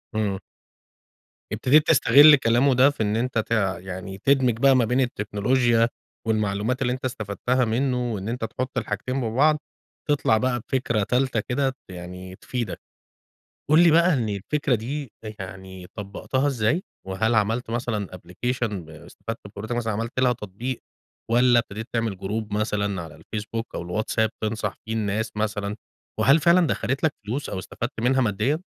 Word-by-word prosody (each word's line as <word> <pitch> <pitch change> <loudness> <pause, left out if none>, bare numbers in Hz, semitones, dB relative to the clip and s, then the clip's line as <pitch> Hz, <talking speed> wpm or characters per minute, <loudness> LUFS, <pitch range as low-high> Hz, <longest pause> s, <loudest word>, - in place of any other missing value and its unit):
إمم. 100 -3 0 1.1
ابتديت 135 +8 +4
تستغل 145 0 +8
كلامه 130 +1 +3
ده 130 +3 +6
في 140 -6 -2
إن 105 +1 0
أنت 120 +1 -1
تع 105 -5 0
يعني 95 +1 -7
تدمج 130 0 +2
بقى 135 0 +6
ما 125 -2 +4
بين 125 +4 +1
التكنولوجيا 115 +1 +2 0.4
والمعلومات 110 +3 0
اللي 125 -1 +1
أنت 130 - -5
استفدتها 120 +2 -1
منّه. 125 +1 0
وإن 100 0 -4
أنت 120 -1 -2
تحُط 130 +3 -4
الحاجتين 125 +4 -2
ببعض، 135 +7 +3 0.5
تطلع 140 -6 +3
بقى 125 +1 0
بفكرة 115 -3 -1
تالتة 125 +2 +1
كده 130 +4 -1
يعني 90 +1 -8
تفيدك. 120 -1 -4 0.9
قُل 155 +2 +7
لي 170 - +7
بقى 170 +3 +5
إن 120 -5 0
الفكرة 125 +7 0
دي 130 +3 -4
أ 110 - -5
يعني 95 -1 -8
طبّقتها 105 +7 -2
إزاي؟ 135 - +1 0.2
وهل 110 +5 0
عملت 110 +3 +1
مثلًا 115 -5 -2
أبلكيشن 95 -1 -3
استفدت 80 +8 -8
بخبرتك 110 +4 -5
مثلًا 115 -2 -1
عملت 115 +4 -2
لها 125 -1 +4
تطبيق 115 +4 -5 0.5
والّا 120 +1 +5
ابتديت 110 -1 -3
تعمل 115 -4 -1
جروب 105 +2 -4
مثلًا 100 -3 -1
على 80 - -10
الفيسبوك 110 +7 -6
أو - - -3
الواتساب 110 +5 0
تنصح 110 -1 -2
فيه 110 - -5
الناس 110 0 -1
مثلًا؟ 105 -1 -2 0.4
وهل 140 +4 +6
فعلًا 170 +2 +5
دخّلت 135 -1 -1
لك 160 - +3
فلوس 130 +7 -3
أو 95 - -4
استفدت 120 +6 -5
منها 130 +3 +3
ماديًا؟ 125 +7 +1
115 Hz, 155 wpm, -24 LUFS, 105-130 Hz, 1.1 s, تستغل